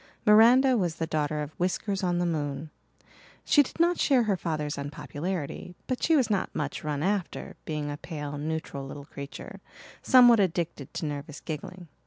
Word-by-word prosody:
Miranda 240 +5 +6
was 175 -6 0
the 165 - -2
daughter 150 -1 -1
of 150 - -7
Whiskers 190 +2 -1
on 175 -2 0
the 175 - +1
moon; 150 -2 -3 0.7
she 295 - +6
did 285 - -5
not 345 +1 +3
share 265 -4 +4
her 210 -3 +1
father's 155 -4 -3
unpopularity 150 +4 -5
but 255 - -3
she 325 - +3
was 265 -5 +3
not 205 -3 0
much 145 -1 -3
run 150 -1 -2
after, 195 -1 -2
being 150 -2 -3
a 145 - -5
pale, 150 -3 -6
neutral 155 -2 -4
little 140 +1 -8
creature, 140 0 -9 0.4
somewhat 245 -3 +7
addicted 170 -7 -1
to - - -3
nervous 145 0 -5
giggling. 175 +3 -7
165 Hz, 170 wpm, -27 LUFS, 150-205 Hz, 0.7 s, somewhat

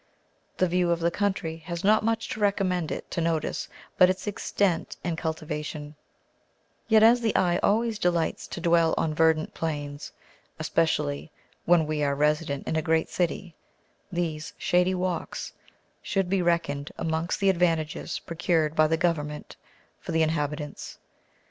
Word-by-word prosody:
The 185 - +3
view 180 0 +1
of 170 -1 +1
the 170 0 +1
country 190 -5 -1
has 170 +2 -6
not 215 +2 +4
much 225 0 0
to - - -4
recommend 185 -5 +1
it - - -6
to 170 - -1
notice 165 -1 -1 0.3
but 180 - +8
its 185 0 -2
extent 200 -3 -1
and 175 -2 -1
cultivation: 150 -2 -4 0.9
yet 220 -1 +5
as 235 +2 +6
the 225 -2 0
eye 175 -1 +3
always 225 +1 +1
delights 175 -3 0
to - - -6
dwell 170 -1 +3
on 155 - 0
verdant 160 0 +2
plains, 145 -2 -4 0.5
especially 155 -2 0 0.4
when 170 -2 +4
we 150 -1 -1
are 140 -1 +1
resident 150 -1 0
in - - -1
a 160 - +2
great 160 0 +1
city, 175 0 -2 0.6
these 165 -3 -3
shady 180 +1 +2
walks 180 -2 -3 0.5
should 195 -2 -1
be 195 -1 +2
reckoned 165 -5 0
amongst 160 +1 -1
the 195 -1 +4
advantages 165 -3 0
procured 165 -2 0
by 155 -1 +5
the 160 +1 +1
Government 150 -3 -2 0.4
for - - -7
the 160 0 +3
inhabitants. 150 -1 -3
165 Hz, 150 wpm, -27 LUFS, 155-180 Hz, 0.9 s, but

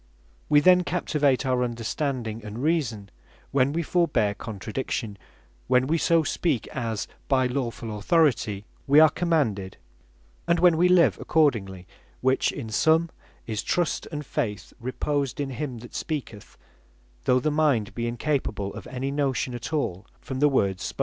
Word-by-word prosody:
We 145 0 +6
then 180 +2 +6
Captivate 145 -5 +1
our 125 -1 +1
Understanding 120 -1 -3
and 110 +4 -6
Reason, 130 -11 -1 0.4
when 135 0 +2
we 170 +3 -1
forbear 145 - +1
contradiction; 110 +1 -4 0.5
when 125 0 +3
we 160 +4 +1
so 165 0 +3
speak, 150 -6 -1
as 115 -5 -3 0.2
(by 130 -3 +3
lawfull 120 -4 -3
Authority) 110 - +2 0.2
we 140 +2 +7
are 155 -1 +7
commanded; 125 - 0 0.7
and 170 0 +3
when 175 -1 +5
we 175 +3 +3
live 180 -2 +4
accordingly; 105 - +1 0.4
which 130 +1 +2
in 110 - -6
sum, 160 +8 +3 0.3
is 110 -2 -3
Trust, 175 -2 -1
and 150 -2 -5
Faith 105 -8 -3
reposed 135 +2 -2
in 140 -2 -2
him 130 -2 -4
that - - -14
speaketh, 140 - -5 0.7
though 125 - +4
the 155 +4 0
mind 145 -9 +1
be 120 0 -2
incapable 120 -5 -2
of - - -9
any 130 +2 -3
Notion 135 -3 -1
at 120 +3 -6
all 105 - -2
from 130 -1 -6
the 150 +1 +5
words 100 -8 +1
spoken. - - -6
130 Hz, 150 wpm, -25 LUFS, 115-155 Hz, 0.7 s, we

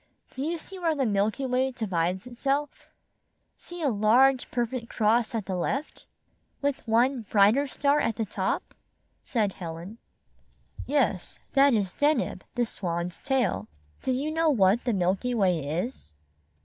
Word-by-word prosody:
Do 260 - -5
you 335 +3 -1
see 375 +4 -10
where 330 -3 +1
the 275 -3 0
Milky 210 +5 0
Way 260 +1 +1
divides 185 -6 -2
itself? 275 +4 -2 0.7
See 350 -1 -8
a 285 - +3
large 245 +5 +4
per 240 -1 0
fect 235 0 -6
cross 225 +2 +1
at 215 -4 -2
the 190 - -3
left?" 270 - -3 0.5
"With 285 -1 -1
one 240 +3 +3
brighter 220 +8 +4
star 285 +2 +1
at 225 - 0
the 225 - -1
top?" - - -2 0.5
said 215 -6 0
Helen. 175 +5 -8 0.9
"Yes, 255 -10 0 0.2
that 275 -2 +5
is 195 -4 -1
Deneb, 295 +1 +1
the 240 0 +2
Swan's 175 -4 -3
tail. 255 - 0 0.3
Do 260 - -1
you 275 +5 -1
know 325 0 +2
what 215 -3 +3
the 240 - +1
Milky 195 +6 0
Way 185 -6 +2
is?" 155 - -4
235 Hz, 150 wpm, -27 LUFS, 195-275 Hz, 0.9 s, that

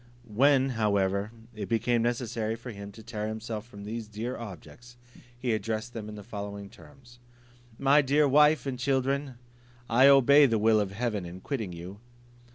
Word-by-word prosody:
When, 135 +3 +4
however, 100 -3 0 0.2
it 105 -3 -6
became 120 +1 +1
necessary 115 -2 -2
for 120 +2 -9
him 100 -1 -9
to 110 - -13
tear 105 -2 -4
himself 110 0 -5
from 100 -4 -11
these 110 +1 -5
dear 110 +4 -5
objects, 120 +3 -11 0.4
he 120 -1 -1
addressed 110 +2 -3
them 110 -2 -6
in 105 - -8
the 105 - -9
following 100 -2 -7
terms: 125 -4 -17 0.6
"My 140 +2 +4
dear 145 +2 +3
wife 150 +2 +4
and 130 -2 -4
children, 135 +1 -1 0.5
I 125 +4 +5
obey 140 +1 +7
the 115 -3 +1
will 110 0 +3
of 100 -2 -1
heaven 105 -2 -2
in 90 +1 -8
quitting 110 -4 -4
you. 90 +4 -9
115 Hz, 165 wpm, -28 LUFS, 105-130 Hz, 0.6 s, obey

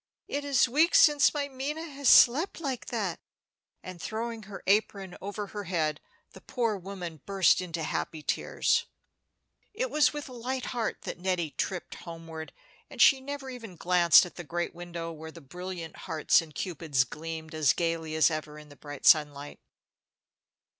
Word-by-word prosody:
It 285 +1 -3
is 280 -3 +3
weeks 305 +8 +4
since 295 -2 +6
my 290 -2 -2
Minna 280 +4 -4
has 280 -3 0
slept 295 +11 +6
like 270 -6 -4
that." - - -2 0.6
And 185 -2 -9
throwing 225 +2 -4
her 195 - -9
apron 195 -2 +1
over 205 +1 -5
her 205 -1 -5
head, 155 -4 -1 0.3
the - - -14
poor 230 -4 -1
woman 180 -5 -7
burst 195 -2 +4
into 170 -3 -4
happy 155 0 -3
tears. - - 0 0.9
It - - -2
was 295 -4 +4
with 295 -1 -6
a - - -11
light 250 +2 -4
heart 235 -3 -3
that - - -6
Nettie 175 -4 -1
tripped 180 +6 -4
homeward, 165 -2 -9 0.4
and - - -12
she 270 -2 +6
never 275 -1 -6
even 230 -7 -9
glanced 175 0 +5
at 180 - -12
the 175 - -6
great 175 +3 -3
window 170 -1 -6
where 160 0 -9
the 165 - -12
brilliant 175 +2 -7
hearts 160 +1 +3
and 155 -2 -13
Cupids 155 -7 0
gleamed 160 +4 -7
as 155 -3 +3
gayly 165 -2 -2
as 160 +1 +4
ever 155 -1 -5
in 150 0 -13
the 145 - -14
bright 145 -1 -9
sunlight. 145 -2 +3
180 Hz, 165 wpm, -28 LUFS, 160-245 Hz, 0.9 s, since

